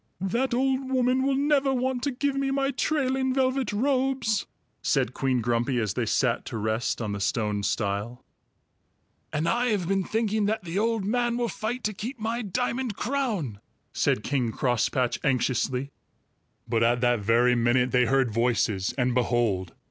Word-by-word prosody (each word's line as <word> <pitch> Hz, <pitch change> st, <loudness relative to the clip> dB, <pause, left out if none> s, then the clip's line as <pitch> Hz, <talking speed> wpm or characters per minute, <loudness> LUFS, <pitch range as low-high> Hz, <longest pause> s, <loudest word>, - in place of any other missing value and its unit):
"That 235 Hz, +9 st, 0 dB
old 265 Hz, +1 st, 0 dB
woman 255 Hz, 0 st, +2 dB
will 270 Hz, 0 st, +1 dB
never 280 Hz, -1 st, +2 dB
want 255 Hz, -1 st, -1 dB
to -, -, +1 dB
give 280 Hz, +2 st, -1 dB
me 275 Hz, 0 st, -1 dB
my 275 Hz, 0 st, +1 dB
trailing 265 Hz, -2 st, 0 dB
velvet 260 Hz, -1 st, +1 dB
robes," 260 Hz, -1 st, 0 dB, 0.3 s
said 115 Hz, -, +1 dB
Queen 130 Hz, -2 st, 0 dB
Grumpy, 120 Hz, +3 st, 0 dB
as 105 Hz, -4 st, -1 dB
they 115 Hz, 0 st, -1 dB
sat 120 Hz, +2 st, +1 dB
to 120 Hz, -, -5 dB
rest 110 Hz, +2 st, -1 dB
on 105 Hz, -, -3 dB
the 100 Hz, -, -3 dB
stone 105 Hz, 0 st, 0 dB
stile. 105 Hz, +4 st, -2 dB, 1.1 s
"And 155 Hz, +2 st, -1 dB
I 240 Hz, +1 st, +1 dB
have 205 Hz, -7 st, 0 dB
been 195 Hz, 0 st, +1 dB
thinking 215 Hz, +1 st, 0 dB
that 215 Hz, -1 st, -1 dB
the 175 Hz, +3 st, -2 dB
old 225 Hz, -2 st, 0 dB
man 240 Hz, +2 st, 0 dB
will 240 Hz, -1 st, 0 dB
fight 225 Hz, +5 st, -4 dB
to 215 Hz, -, -1 dB
keep 240 Hz, +7 st, -6 dB
my 225 Hz, +2 st, -2 dB
diamond 240 Hz, +3 st, -2 dB
crown," 215 Hz, -, -2 dB, 0.3 s
said 105 Hz, -, +1 dB
King 125 Hz, -5 st, 0 dB
Crosspatch 120 Hz, +1 st, 0 dB
anxiously. 130 Hz, 0 st, 0 dB, 0.8 s
But 115 Hz, -1 st, +1 dB
at 120 Hz, +1 st, +3 dB
that 120 Hz, -2 st, +3 dB
very 115 Hz, +4 st, +3 dB
minute 120 Hz, +1 st, +2 dB
they 125 Hz, -1 st, +4 dB
heard 135 Hz, -3 st, +2 dB
voices, 110 Hz, -5 st, +1 dB
and 125 Hz, -1 st, +1 dB
behold! 115 Hz, -7 st, 0 dB
185 Hz, 165 wpm, -26 LUFS, -, 1.1 s, they